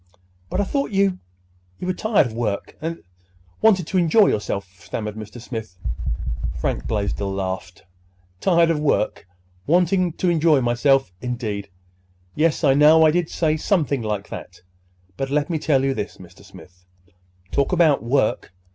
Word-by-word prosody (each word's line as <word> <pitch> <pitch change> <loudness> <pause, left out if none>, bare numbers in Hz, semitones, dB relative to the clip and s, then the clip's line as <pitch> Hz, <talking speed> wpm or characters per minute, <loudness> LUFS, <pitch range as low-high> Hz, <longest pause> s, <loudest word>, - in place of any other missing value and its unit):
"But - - -2
I - - +3
thought 280 +7 -1
you—you 90 - -4
were 185 - 0
tired 215 -4 +2
of 120 - -5
work, 110 -3 -3
and—wanted 90 - -2
to 185 +3 0
enjoy 190 +5 +5
yourself," 100 -2 -2
stammered 105 +3 -5
Mr. 110 +2 -9
Smith. 110 -5 -7 0.8
Frank - - -2
Blaisdell 100 -2 -2
laughed. 95 -2 -4 0.6
"Tired 170 - +3
of 155 - 0
work—wanted 150 - 0
to 185 - +1
enjoy 160 -3 +4
myself, 125 -2 +2
indeed! 110 -5 -4 0.6
Yes, 160 +2 +1
I 140 -3 +5
know 155 +3 +6
I 155 - +5
did 175 0 0
say 155 -2 0
something 150 - 0
like 105 -2 -3
that. 90 0 -9 0.6
But, 135 - -2
let 150 +4 0
me 160 - 0
tell 140 -3 +2
you 135 0 +1
this, 105 - -5
Mr. 90 -1 -15
Smith. 90 0 -16 0.7
Talk 140 - +1
about 165 -6 +4
work! 120 -5 0
135 Hz, 145 wpm, -22 LUFS, 100-165 Hz, 0.8 s, know